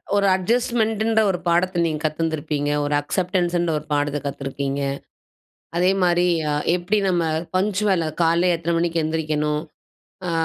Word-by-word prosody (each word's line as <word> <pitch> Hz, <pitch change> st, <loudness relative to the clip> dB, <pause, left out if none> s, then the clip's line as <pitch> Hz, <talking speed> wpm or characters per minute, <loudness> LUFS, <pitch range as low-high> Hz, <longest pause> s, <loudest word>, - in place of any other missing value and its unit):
ஒரு 200 Hz, 0 st, +3 dB
அட்ஜஸ்ட்மெண்ட 225 Hz, +2 st, 0 dB
ன்ற 220 Hz, -1 st, +3 dB
ஒரு 180 Hz, -2 st, -1 dB
பாடத்த 175 Hz, +1 st, +2 dB
நீங்க 155 Hz, -2 st, -1 dB
கத்திந்திருபீங்க. 155 Hz, -2 st, -1 dB
ஒரு 145 Hz, 0 st, -1 dB
அக்செப்டன்ஸ் 180 Hz, +3 st, -1 dB
ன்ற 170 Hz, -1 st, 0 dB
ஒரு 150 Hz, -, -15 dB
பாடத்த 145 Hz, 0 st, 0 dB
கத்திருக்கீங்க. 140 Hz, 0 st, -3 dB, 1.0 s
அதேமாரி, 180 Hz, -1 st, +3 dB, 0.5 s
எப்டி 180 Hz, +4 st, 0 dB
நம்ம 175 Hz, -2 st, +1 dB, 0.3 s
பங்க்சுவல் 195 Hz, -2 st, +1 dB, 0.2 s
காலையில 170 Hz, +2 st, +3 dB
எத்தனை 170 Hz, +1 st, -2 dB
மணிக்கு 170 Hz, -1 st, 0 dB
எந்திரிக்கணும் 155 Hz, -1 st, -1 dB, 0.7 s
அ -, -, 0 dB
170 Hz, 125 wpm, -22 LUFS, 155-185 Hz, 1.0 s, ஒரு